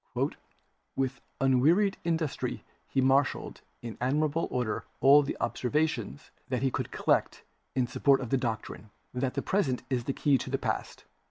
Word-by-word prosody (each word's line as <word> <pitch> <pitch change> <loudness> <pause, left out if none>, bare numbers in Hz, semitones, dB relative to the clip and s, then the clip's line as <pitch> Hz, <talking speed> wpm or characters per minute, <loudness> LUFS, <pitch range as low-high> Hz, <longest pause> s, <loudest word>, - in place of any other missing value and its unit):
"With 135 -1 -2 0.2
unwearied 155 +10 +3
industry 165 -3 -2 0.2
he 135 - +1
marshalled 135 +1 +1 0.2
in 115 -2 -7
admirable 150 +5 +1
order 125 -4 -2 0.2
all 140 +2 +7
the 140 - -4
observations 125 - -1 0.2
that 130 -1 -1
he 135 - +2
could - - -3
collect - - 0 0.3
in 130 -2 +2
support 135 +2 +3
of 125 -4 -6
the - - +4
doctrine 110 -3 -4 0.2
that 125 +1 -2
the 140 - -1
present 150 -11 0
is 125 -2 0
the 135 - -1
key 140 -1 +2
to - - -5
the - - 0
past. - - -3
135 Hz, 155 wpm, -29 LUFS, 125-145 Hz, 0.3 s, all